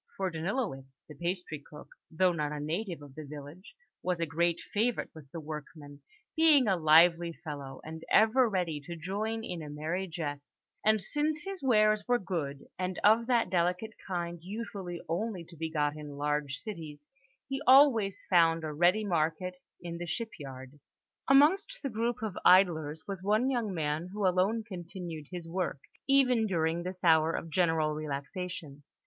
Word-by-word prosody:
For 190 -1 -1
Danilowitz, 160 - -4
the 150 - -10
pastry 175 0 -3
cook, 150 +1 -13 0.2
though 180 +3 +3
not 150 -3 -2
a 150 - -4
native 165 +2 -3
of 140 -2 -12
the 155 - -8
village, 150 +5 -10 0.3
was 180 -2 -1
a 165 - +1
great 170 +2 0
favourite 230 +3 -1
with 155 -4 -13
the 165 - -7
workmen, 150 -1 -9 0.3
being 310 -6 +5
a 195 - +4
lively 170 +1 +5
fellow, 140 -4 -6
and 160 +1 -8
ever 225 +3 +5
ready 175 -7 -1
to 170 - -6
join 210 +7 -3
in 180 -6 -5
a 150 - -7
merry 160 +6 -3
jest; 145 -4 -6 0.2
and 215 0 +4
since 295 - -1
his 390 -1 -5
wares 215 -5 +4
were 245 0 +4
good, 155 -9 -4
and 185 0 -2
of 225 +3 +5
that 235 -7 +2
delicate 180 +4 0 0.2
kind 175 -2 -3
usually 190 -2 -6
only 185 +2 -2
to 170 - -15
be 160 0 -3
got 150 -2 0
in 150 -2 -8
large 145 -1 -1
cities, 155 -8 -8 0.4
he 270 0 -3
always 250 -8 +5
found 165 -2 +4
a 155 -1 -3
ready 180 +7 +3
market 180 +1 -1 0.3
in 170 -1 -5
the 175 - -5
shipyard. 145 - -6 0.5
Amongst 320 - +4
the 275 - -1
group 230 +1 -1
of 210 -4 -3
idlers 160 -5 +4
was 195 -2 -4
one 215 +7 +2
young 235 -5 -1
man 155 -1 -2
who 205 0 -2
alone 190 +5 +2
continued 175 -6 -7
his 175 -2 -6
work, 180 -2 -2 0.3
even 255 -5 +4
during 165 -2 0
this 185 +1 -6
hour 160 -1 +5
of 165 - -4
general 160 -2 +2
relaxation. 150 +1 -5
175 Hz, 165 wpm, -30 LUFS, 155-210 Hz, 0.5 s, being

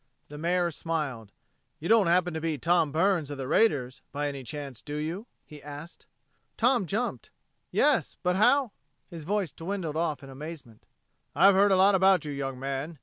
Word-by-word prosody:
The 150 - -9
Mayor 175 +1 +1
smiled. 145 -10 -4 0.5
"You 165 - -5
don't 220 -4 +5
happen 175 0 +2
to 160 - -4
be 160 -2 -1
Tom 165 +1 +2
Burns 165 -1 +1
of 145 - -6
the 135 -1 -5
raiders, 135 - +1
by 145 +1 -2
any 140 -2 -7
chance, 140 -2 -7
do 145 - -7
you?" 165 +9 -4 0.2
he 150 -2 -13
asked. 145 +3 -10 0.5
Tom 240 -5 +2
jumped. 205 - -3 0.4
"Yes - - +2
but 180 0 +1
how...." 245 +4 +3 0.4
His 165 -3 -8
voice 200 -3 -1
dwindled 170 -3 -4
off 160 -3 -1
in 135 - -10
amazement. 140 -5 -10 0.5
"I've 195 +6 +6
heard 200 +1 +4
a - - +5
lot 195 +2 +5
about 190 -2 +4
you, 150 - -4
young 135 -2 -4
man. 140 +4 -4
165 Hz, 180 wpm, -28 LUFS, 145-190 Hz, 0.5 s, I've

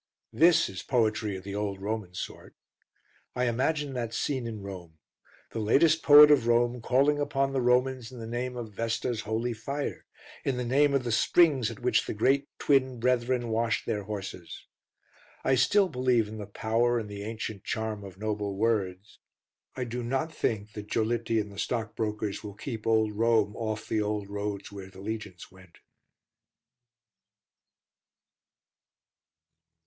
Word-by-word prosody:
This 165 0 +5
is 95 -1 -7
poetry 110 -4 0
of 95 - -10
the 100 - -6
old 100 -1 -3
Roman 100 -2 -4
sort. - - -7 0.8
I 125 - 0
imagine 135 +4 0
that 120 -3 -3
scene 130 -5 -1
in 110 -3 -6
Rome: 90 -5 -9 0.5
the 115 - -4
latest 155 +9 +4
poet 150 0 +9
of 130 -6 +4
Rome 120 +1 +2
calling 140 +5 +2
upon 135 -1 0
the 135 - +1
Romans 125 0 +1
in 125 - -10
the 115 - -6
name 125 +2 -3
of 115 -3 -6
Vesta's 115 +1 -2
holy 110 +3 -2
fire, 140 +6 -5 0.4
in 135 -2 -1
the 125 - -2
name 140 +3 +3
of 135 - +1
the 120 - -2
springs 135 -1 +4
at 115 - -9
which 125 - +2
the - - -3
Great 135 +6 +2
Twin 130 -3 +2
Brethren 125 0 +1
washed 115 0 0
their 105 -2 -2
horses. 95 -4 -7 0.8
I 135 - +2
still 190 +11 +4
believe 125 -6 +1
in 110 +1 -8
the 105 - -6
power 115 +3 +1
and 110 -2 -3
the 100 -1 -7
ancient 110 -1 -5
charm 110 -2 -3
of 95 -2 -10
noble 105 -1 -2
words. 100 -3 -1 0.6
I 130 - -2
do 125 +1 -4
not 135 +7 -2
think 105 -7 -2
that 105 0 -8
Giolitti 115 0 +1
and 105 -1 -4
the 100 - -9
stockbrokers 110 -3 -2
will 105 -2 -8
keep 115 -1 -6
old 110 -1 +3
Rome 110 -1 +2
off 110 -1 -4
the 110 - 0
old 105 -1 -3
roads 100 -1 -4
where 100 -1 -9
the 95 - -14
legions 100 -3 -6
went. 95 -3 -18
115 Hz, 160 wpm, -28 LUFS, 105-125 Hz, 0.8 s, poet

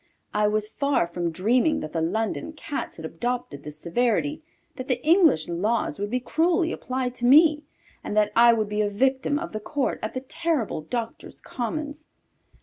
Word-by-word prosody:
I 210 0 +2
was 210 0 +1
far 280 -9 +1
from 170 0 -3
dreaming 235 - +2
that 155 - -7
the 165 - -1
London 220 - -2
Cats 290 -2 -5
had 160 - -8
adopted 235 - -4
this 150 +1 -9
severity, 240 - 0 0.3
that 255 -1 -7
the 255 -2 0
English 320 - +4
laws 200 +6 -1
would 205 0 -2
be 250 +3 0
cruelly 330 +6 +1
applied 255 -1 -3
to 240 - -2
me, 300 +3 +6 0.4
and 210 - -4
that 210 0 +3
I 235 +1 +7
would 220 -2 +1
be 210 +1 -1
a 205 - +1
victim 265 +6 +1
of 335 +2 -5
the 215 - -4
court 275 +5 -2
at 215 - -4
the 255 - -2
terrible 290 - -2
Doctors' 230 +8 -5
Commons. 290 +5 -5
240 Hz, 180 wpm, -25 LUFS, 205-285 Hz, 0.4 s, I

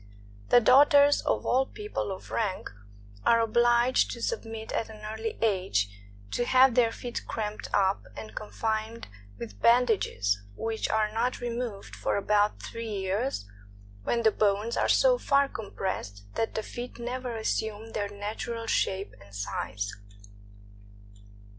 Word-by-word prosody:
The - - +8
daughters 285 +4 +6
of - - -1
all 265 +2 +2
people 420 - -4
of 190 - -8
rank 205 -5 -2 0.5
are 230 - +5
obliged 240 +2 +3
to - - -6
submit 225 - -4
at 225 - -2
an 215 -1 -11
early 220 +1 -4
age 180 - +1 0.4
to 240 - 0
have 255 +1 +5
their 235 -2 +4
feet 240 +1 -6
cramped 215 -1 -4
up 195 0 +2
and 110 -1 -8
confined 220 - -3 0.3
with 100 -2 -9
bandages, 220 - +3
which 225 - -2
are 215 -1 +1
not 240 +3 0
removed 235 -4 -4
for - - -1
about 210 +1 +1
three 230 -1 -6
years, 200 - -2 0.6
when 235 - 0
the 220 - +5
bones 210 +3 +1
are - - +1
so - - +5
far 280 - +3
compressed 190 - -5
that 225 - -2
the 220 - -1
feet 245 +3 -7
never 245 0 -4
assume 220 0 -2
their 205 -2 -2
natural 215 +3 -5
shape 195 -3 0
and 100 0 -15
size. 100 0 -3
220 Hz, 140 wpm, -28 LUFS, 200-240 Hz, 0.6 s, The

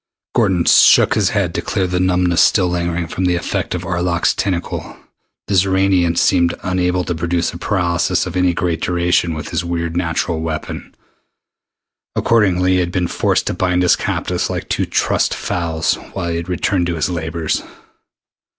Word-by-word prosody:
Gordon 90 -3 +2
shook - - +6
his - - +2
head - - -1
to - - -2
clear 95 - -1
the 90 0 -1
numbness 90 -1 +2
still 95 -4 +4
lingering 85 -1 -1
from 90 +3 -3
the 90 -1 +2
effect 85 - -2
of - - -4
Arlok's 85 0 0
tentacle. 90 -3 -3 0.5
The 100 - -3
Xoranian 95 -2 +2
seemed 85 -2 +3
unable 90 0 0
to 90 - -2
produce 85 +1 -1
a 85 - -8
paralysis 90 -4 0
of - - -6
any 90 -1 +2
great 85 -2 -1
duration 85 -1 +1
with 80 - -6
his 85 -1 -2
weird 85 -1 -3
natural 80 -1 -1
weapon. 80 -1 -5 1.2
Accordingly, 95 -5 +2
he 90 - +2
had 90 -1 -1
been 90 -1 0
forced - - 0
to - - -1
bind 90 -1 0
his 90 - +4
captives - - -2
like - - -4
two - - -1
trussed - - 0
fowls 80 -2 -1 0.2
while 85 - -3
he 85 0 -2
returned 90 +1 -1
to 85 - -2
his 80 - 0
labors. 80 -2 -2
90 Hz, 170 wpm, -18 LUFS, 85-90 Hz, 1.2 s, shook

